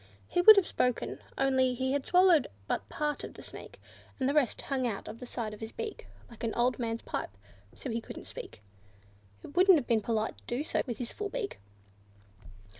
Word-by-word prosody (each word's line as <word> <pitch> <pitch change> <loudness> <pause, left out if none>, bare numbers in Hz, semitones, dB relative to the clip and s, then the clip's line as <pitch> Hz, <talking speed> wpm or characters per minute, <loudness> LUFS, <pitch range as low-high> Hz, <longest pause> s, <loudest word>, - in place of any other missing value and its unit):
He 355 - +2
would 435 +4 +11
have 395 -3 +4
spoken, 250 -7 -1 0.2
only 260 -2 +3
he 260 +1 -1
had 280 -1 -1
swallowed 360 -5 +5 0.4
part 295 -1 -2
of - - -8
the - - -10
Snake, - - -10 0.4
and 260 - +1
the 280 - +1
rest 290 -5 +2
hung 260 -3 -1
out 205 -4 -4
of 230 - -8
the 250 - -8
side 225 -3 -4
of 210 - -10
his 220 0 -6
beak, 440 -2 -6 0.2
like 235 -1 -13
an 225 - -1
old 245 +1 +2
man's 230 -1 -2
pipe; - - -3 0.5
so 260 - -5
he 230 +1 -2
couldn't - - -9
speak. 105 - -9 0.8
It 285 - -11
wouldn't 370 0 +7
have 280 - -1
been 225 -2 +2
polite 220 0 -1
to - - -28
do 245 +4 -1
so - - 0
with 240 -3 -3
his 240 0 -5
beak 420 +1 -4
full. 100 -1 -25
250 Hz, 205 wpm, -30 LUFS, 220-295 Hz, 0.8 s, would